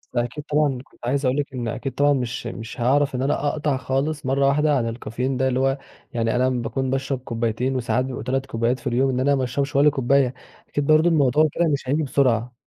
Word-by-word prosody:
أكيد 120 +5 -2
طبعًا 150 -3 +1
كنت 130 - -14
عايز 135 +3 0
أقول 130 +2 +1
لِك 145 -1 -2
إن 120 -2 -3
أكيد 135 +4 -3
طبعًا 145 0 +4
مش 125 -3 -3
مش 115 +2 -7
هاعرف 135 +3 +2
إن 125 - -2
أنا 140 +2 0
أقطع 145 -2 0
خالص 140 +3 -2
مرّة 135 +1 +2
واحدة 150 +1 +3
عن 115 -2 -1
الcaffeine 125 +3 -3
ده، 130 - +2
اللي 130 0 0
هو 135 +1 +1 0.4
يعني 115 -1 0
أنا 130 +1 +2
باكون 130 +1 -2
باشرب 135 0 -1
كوبّايتين 120 +1 -2
وساعات 125 0 0
بيبقوا 130 -3 -5
3 130 +2 -1
كوبّايات 120 0 -1
في - - -6
اليوم، 130 +3 +2
إن 130 -1 -1
أنا 140 +2 +3
ما 135 - 0
أشربش 135 +3 -2
ولا 145 +2 +6
كوبّاية، 135 -2 +2 0.4
أكيد 145 -1 -2
برضه 155 +2 +5
الموضوع 150 -1 +3
كده 170 - +1
مش 135 -2 -3
هييجي 150 +3 +1
بسرعة. 125 -4 +1
130 Hz, 225 wpm, -23 LUFS, 125-140 Hz, 0.4 s, ولا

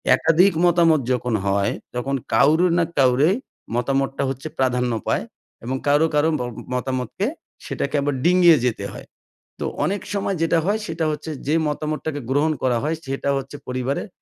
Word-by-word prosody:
একাধিক 180 +4 +4
মতামত 170 -3 +4
যখন 125 -2 -2
হয়, 100 0 +1 0.2
তখন 135 +3 -1 0.2
কারো 150 +9 +5
না 170 - +4 0.2
কারো 135 +5 +4 0.5
মতামতটা 135 +2 0
হচ্ছে 135 +3 -5
প্রাধান্য 125 -2 +1 0.2
পায় - - +1 0.4
এবং 130 +3 -2
কারো, 145 +3 +4
কারো 150 +2 +3
বম 120 0 -3 0.2
মতামতকে 125 - -2 0.4
সেটাকে - - -3
আবার 145 -1 0
ডিঙিয়ে 175 -2 +6
যেতে 120 - -3
হয়। - - -10 0.5
তো - - -2 0.2
অনেক 200 +1 -1
সময় 195 -1 -1
যেটা 165 0 +2
হয়, 210 +2 +1
সেটা 160 - -2
হচ্ছে 150 +1 -5 0.2
যে 150 - +2
মতামতটাকে 150 0 -3
গ্রহণ 150 +3 +2
করা 125 -2 +2
হয়, 160 +2 0
সেটা 135 +1 -2
হচ্ছে 135 +2 -6
পরিবারের 130 - -2
145 Hz, 155 wpm, -22 LUFS, 130-160 Hz, 0.5 s, ডিঙিয়ে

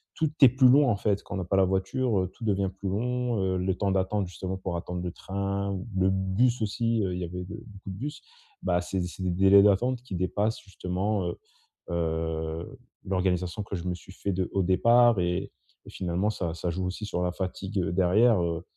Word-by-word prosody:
tout 160 -1 +1
est 135 - +10
plus 130 +2 +5
long, 140 +1 +6
en - - +2
fait, 100 0 0
quand - - -9
on - - -2
n'a - - -2
pas 95 +3 +1
la 95 - +5
voiture, 95 +5 0
heu, 95 0 -3
tout 115 - -8
devient 100 -2 +1
plus 100 - -5
long, 125 +3 -1
heu, 95 -1 0
le 90 0 0
temps 100 - 0
d'attendre, 95 +1 0
justement, 90 +2 -5
pour 95 -2 -3
attendre 90 +1 -5
le 90 - -3
train 100 +1 -3
ou 95 +1 -5
le 95 0 +3
bus 95 +6 +1
aussi, 115 +1 0
heu, 95 -2 -1
il - - -4
y - - -3
avait 90 +1 -5
le 90 - -5 0.2
beaucoup 100 -4 -11
de 95 - -6
bus. 145 +7 -5 0.4
Bah, 90 - +2
c'est 95 +1 -2
c'est 90 +1 -6
des 90 - 0
délais 95 +2 +6
d'attente 120 +5 +3
qui 125 - -8
dépassent, 100 +5 -1
justement, 95 0 -2
heu - - -6 0.5
heu, 80 +3 -2 0.3
l'organisation 90 +1 0
que 100 - -5
je 85 -1 -5
me 90 -1 -1
suis 90 +1 -14
fait 100 +1 -3
de 90 -1 -1
au 100 - +2
départ 115 +4 +5
et 90 +1 -1 0.3
et - - -11
finalement, 90 +3 -1
ça 85 -6 -3
ça 85 +1 -3
joue 90 +2 -3
aussi 95 +4 -4
sur 90 -3 -2
la 90 - 0
fatigue 95 +2 -3
derrière, 95 +5 +4
heu 85 -1 -2
95 Hz, 225 wpm, -27 LUFS, 90-105 Hz, 0.5 s, est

